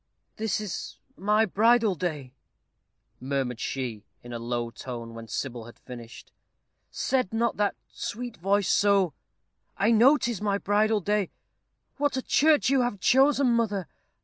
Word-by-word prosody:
"This 215 -4 -1
is 210 -5 -5 0.2
my 210 +2 +2
bridal 225 +1 +3
day," 150 -7 -4 0.9
murmured 130 -2 -2
she, 120 -6 -4 0.2
in 120 0 -9
a 120 - -4
low 120 0 -3
tone, 115 -2 -7
when 115 0 -9
Sybil 120 0 -4
had 120 - -13
finished. 120 -2 -11 0.6
"Said 255 -7 -1
not 230 +1 0
that 205 -1 +1
sweet 240 +1 -6
voice 195 +3 +1
so? 200 -5 +3 0.6
I 210 +3 +3
know 245 +7 +6
'tis 235 -8 -3
my 200 -1 +1
bridal 210 +1 +1
day. 205 0 0 0.7
What 290 -1 0
a 260 - -2
church 305 0 +3
you 270 0 +3
have 240 -5 -1
chosen, 270 +4 +4
mother! 210 -6 0
200 Hz, 145 wpm, -27 LUFS, -, 0.9 s, know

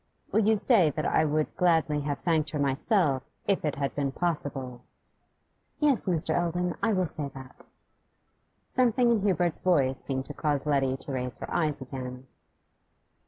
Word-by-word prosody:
'Will - - +3
you 220 +1 +3
say 200 - +4
that 155 +1 -3
I - - +3
would 155 0 -1
gladly 165 -4 +2
have 145 -1 -2
thanked 160 -3 0
her 150 - -4
myself, 140 - +1 0.3
if 195 - +2
it 150 -2 -1
had 140 0 -2
been 140 -2 -1
possible?' 135 -6 -2 1.0
'Yes, 285 -8 +3
Mr. 170 -4 +1
Eldon, 175 +1 0
I 225 - +2
will 185 -3 +1
say 150 -3 -1
that.' 130 -1 -12 1.0
Something 245 -1 +2
in 225 -3 +2
Hubert's 180 -4 +1
voice 140 -8 +1
seemed 130 -1 -3
to 145 - -8
cause 145 -2 -1
Letty 135 -3 +1
to 140 - -8
raise 125 -2 -4
her - - -7
eyes 155 -4 0
again. 130 0 -7
150 Hz, 165 wpm, -28 LUFS, 135-180 Hz, 1.0 s, say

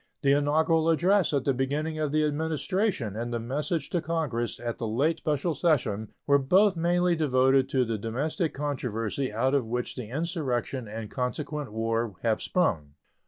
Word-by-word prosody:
The 140 - +4
inaugural 160 +3 +2
address 180 +3 +3
at 140 -3 0
the 140 - +3
beginning 150 +5 -2
of 150 -2 -1
the 155 0 +2
Administration 160 - -1
and 120 +2 -3
the 120 - -1
message 145 +6 -2
to 175 - 0
Congress 150 -8 -2
at 120 -1 -4
the 115 - -2
late 140 +9 +1
special 150 +2 0
session 115 - 0
were 140 0 +4
both 190 +9 +4
mainly 175 +1 +2
devoted 135 -3 +3
to 130 -2 +2
the 110 -2 -2
domestic 145 - -2
controversy 130 -3 -2
out 130 +5 +1
of 135 -5 +1
which 120 +1 -2
the 125 -5 -6
insurrection 135 -5 -2
and 110 0 -6
consequent 140 +1 -3
war 115 -1 -1
have 110 -2 +1
sprung. 80 - 0
140 Hz, 165 wpm, -27 LUFS, 120-160 Hz, -, The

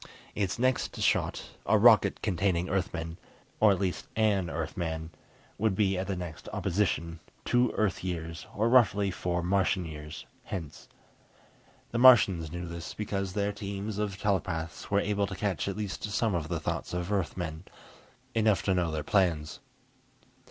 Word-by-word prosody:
Its 100 -3 -1
next 130 +1 0
shot, - - 0 0.2
a - - +5
rocket - - +5
containing 90 -1 +1
Earthmen, 85 -3 -2 0.4
or 105 -1 +6
at 95 - +1
least 95 -3 -2
an 105 -5 +2
Earthman, 80 0 -3 0.5
would 110 -2 +2
be 95 -1 +2
at 95 +1 -2
the 100 - -1
next 85 -3 -7
opposition, 85 -3 -1 0.3
two 120 -1 +3
Earth 105 -4 0
years, 85 -2 -4
or 110 +3 +2
roughly 105 -5 +4
four 90 -1 -2
Martian 95 0 +1
years, 75 -1 -8 0.2
hence. 80 -6 -6 1.0
The 120 - -1
Martians 100 -11 +6
knew 90 +1 -5
this, 85 0 -7
because 100 -3 -3
their 100 0 0
teams 100 +1 -5
of 105 -2 -2
telepaths 85 -5 -2
were 100 - +3
able 100 -1 0
to 95 - -6
catch 100 -1 -1
at 100 0 -3
least 105 -3 -4
some 105 +1 0
of 85 -3 -1
the - - -1
thoughts - - -3
of 90 +2 -3
Earthmen, 90 -4 -2 0.7
enough 110 -3 +2
to 95 - +2
know 90 -2 +1
their 80 -1 -3
plans. 80 -4 +1
95 Hz, 155 wpm, -29 LUFS, 85-105 Hz, 1.0 s, or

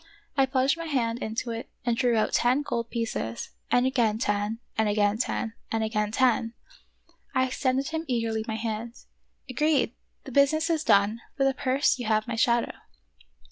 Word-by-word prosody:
I 270 -1 +4
plunged 265 +2 +2
my 330 - -4
hand 240 -5 0
into 225 +2 -3
it 230 +1 -5 0.2
and 240 -1 +2
drew 240 -2 +2
out 215 - +1
ten 255 +4 +3
gold 235 -4 -3
pieces, 225 - -3 0.2
and 245 +1 +3
again 235 -5 +2
ten, 205 -1 -1 0.2
and 220 -1 +2
again 205 +1 +2
ten, 230 -2 -1 0.2
and 225 0 0
again 210 -1 -1
ten.. 230 -1 +2 0.8
I 260 - +4
extended 260 +2 0
him 320 +1 -3
eagerly 230 -3 -1
my 220 - -2
hand. 225 +1 -4 0.5
"Agreed! 300 +3 +1 0.3
the 270 - -9
business 310 +5 +3
is 320 -2 0
done; 210 0 +3 0.2
for 275 - +2
the 270 0 +3
purse 265 0 +1
you 240 - -4
have 215 0 +1
my 235 - -2
shadow 235 +1 +2
235 Hz, 175 wpm, -27 LUFS, 220-265 Hz, 0.8 s, I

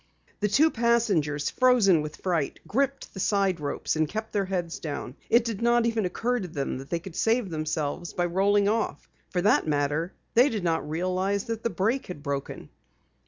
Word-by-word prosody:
The 210 - +1
two 295 +10 +4
passengers, 210 -12 +1
frozen 235 -10 +4
with 150 0 -6
fright, 170 -7 -1
gripped 275 +4 -1
the 190 - -8
side 195 -3 +1
ropes, 145 +1 -2
and 155 -1 +1
kept 220 +3 -5
their 200 -2 +1
heads 175 -3 -3
down. 145 -4 -5
It 235 0 +4
did 225 -3 -3
not 235 0 +3
even 225 -3 +1
occur 245 +7 -1
to 190 - -4
them 140 -5 -3
that 135 - -10
they 170 - 0
could 170 0 -9
save 225 -4 +1
themselves 155 +1 -2
by 175 - 0
rolling 200 +3 +2
off. 220 +1 -1 0.2
For 180 -1 -1
that 205 -5 +3
matter, 150 +3 0 0.2
they 250 +5 +6
did 215 -7 -3
not 165 -3 0
realize 185 +4 0
that 225 -1 -4
the 230 - 0
brake 225 +6 0
had 160 -6 -8
broken. 140 -2 -4
190 Hz, 190 wpm, -27 LUFS, 160-225 Hz, 0.2 s, they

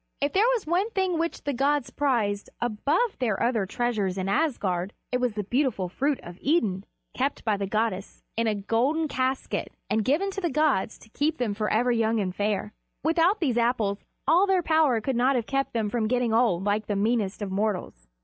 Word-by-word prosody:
If 285 +1 0
there 415 +5 +4
was 460 - -4
one 360 +7 +1
thing 380 -6 0
which 335 0 -2
the 285 - -1
gods 275 0 +1
prized 220 -8 0
above 285 - 0
their 225 -6 0
other 230 -5 +1
treasures 210 -4 -1
in 190 0 -2
Asgard, 200 - 0 0.2
it 250 - +1
was 250 -3 0
the 210 0 -3
beautiful 240 -5 0
fruit 275 +8 0
of 175 +1 -10
Idun, 215 - +1 0.3
kept 275 -1 -2
by 215 -2 +2
the 200 -1 -3
goddess 210 -2 -2
in 230 0 +1
a 215 - +1
golden 245 +10 +1
casket 260 -1 -2 0.2
and 220 - +2
given 330 - +1
to 390 - -5
the 345 - 0
gods 285 -8 +1
to 220 - -18
keep 300 +7 0
them 235 -4 -1
forever 220 +4 +1
young 225 -1 +1
and 185 -3 -2
fair. 210 0 -1 0.3
Without 335 +6 +3
these 255 -8 +1
Apples 230 -4 +1 0.3
all 360 +5 +5
their 375 -2 +2
power 310 -8 +3
could 265 +3 -1
not 255 +3 +3
have 240 -3 0
kept 275 +1 -1
them 225 -2 -1
from 220 0 -1
getting 245 -1 +1
old 225 -6 +3
like 210 +1 0
the 205 - -1
meanest 210 -1 0
of 195 - -4
mortals. 190 - -2
240 Hz, 200 wpm, -26 LUFS, 210-290 Hz, 0.3 s, all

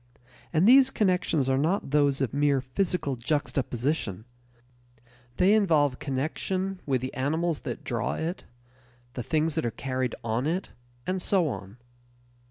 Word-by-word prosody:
And 170 +4 +3
these 265 +2 +8
connections 180 - +1
are 135 0 +2
not 160 -1 0
those 145 -2 +3
of 130 -4 -1
mere 145 -1 +2
physical 140 +2 -1
juxtaposition; 125 - -2 1.1
they 190 +3 +5
involve 155 -11 +3
connection 185 +7 -2
with 130 -3 +1
the 130 - -4
animals 160 +4 0
that - - -6
draw 115 -5 -2
it, 165 +3 -4 0.7
the 125 - -4
things 155 +4 0
that 160 - -1
are 120 - 0
carried 130 +1 -3
on 115 +4 -1
it, 180 +4 -2 0.3
and 185 0 -1
so 180 -3 +2
on. 100 -3 -7
145 Hz, 140 wpm, -27 LUFS, 130-180 Hz, 1.1 s, these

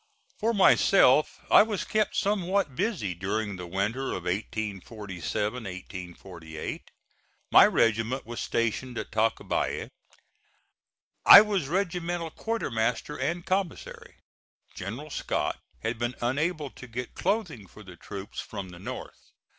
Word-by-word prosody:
For 225 - +2
myself, 185 - +5
I - - +9
was 210 -2 -1
kept 215 -1 0
somewhat 195 -7 0
busy 185 - -1
during 100 +3 -2
the 90 -1 -7
winter 105 +9 -1
of 90 - -4
1847 105 +2 -3
8. 90 -3 -7 0.7
My - - +9
regiment 115 +3 +1
was 120 +1 -6
stationed 115 +2 -1
in - - -3
Tacubaya. 110 +1 0 1.3
I 200 - +12
was 200 -8 -1
regimental 175 -1 -2
quartermaster 125 - -2
and 175 +1 -2
commissary. 190 -2 -3 0.6
General 125 +11 -6
Scott - - -2 0.2
had 110 +1 -2
been 120 +1 -2
unable 145 +4 -1
to 125 - -12
get 125 +1 -6
clothing 180 - -2
for 105 +4 -14
the 90 -3 -12
troops 100 +3 -8
from 95 -2 -6
the 85 -1 -11
North. 125 +7 -9
120 Hz, 120 wpm, -27 LUFS, -, 1.3 s, I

